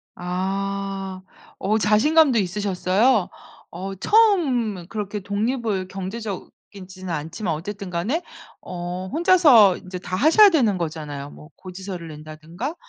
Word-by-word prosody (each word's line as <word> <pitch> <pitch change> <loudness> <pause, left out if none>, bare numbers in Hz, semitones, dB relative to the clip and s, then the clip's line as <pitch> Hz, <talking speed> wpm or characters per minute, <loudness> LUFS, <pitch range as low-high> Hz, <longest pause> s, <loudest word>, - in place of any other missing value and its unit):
아. 195 +1 -3 0.4
어 215 +3 +1
자신감도 255 +6 +4
있으셨어요? 200 +3 +1 0.4
어 195 +2 -6
처음 255 - +2
그렇게 210 -1 -4
독립을 205 -1 -2
경제적이지는 195 -2 -8
않지만 165 +5 -4
어쨌든 200 +5 -6
간에 205 - -1 0.4
어 180 +1 -6
혼자서 300 - +6
이제 185 -1 -8
다 185 0 -5
하셔야 330 - +6
되는 240 - +2
거잖아요. 150 -4 -5
뭐 150 - -14
고지서를 185 -2 -8
낸다든가 155 - -7
195 Hz, 275 characters per minute, -22 LUFS, 180-225 Hz, 0.4 s, 혼자서